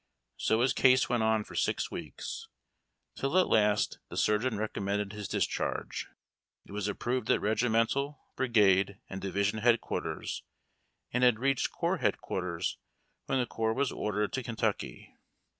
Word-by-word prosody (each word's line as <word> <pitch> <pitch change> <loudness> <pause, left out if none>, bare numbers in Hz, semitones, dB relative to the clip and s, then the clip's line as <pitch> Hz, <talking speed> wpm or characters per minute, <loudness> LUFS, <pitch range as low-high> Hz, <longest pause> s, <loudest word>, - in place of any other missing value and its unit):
So 110 +1 +2
his 125 -1 +3
case 130 0 +5
went 120 -1 +1
on 110 -1 +2
for - - -13
six - - 0
weeks, - - -6 0.7
till 135 +6 0
at 185 - +5
last 105 -1 +3
the - - -7
surgeon 105 +2 +2
recommended 100 -1 -2
his 105 -2 -5
discharge. - - -2 0.6
It - - -15
was 105 0 -2
approved 120 +5 -2
at - - +4
regimental, 120 +6 +1 0.2
brigade, 100 -6 +3
and 95 0 -5
division 100 +3 0
headquarters, 120 +1 0 0.7
and 125 +1 +1
had 125 -3 +6
reached 135 +2 +1
corps - - 0
headquarters 90 -2 -2 0.5
when 135 - +1
the 125 - +2
corps 110 -1 -1
was 140 -1 +1
ordered 105 0 -1
to 130 - -1
Kentucky. 110 -3 -3
110 Hz, 140 wpm, -30 LUFS, 105-125 Hz, 0.7 s, had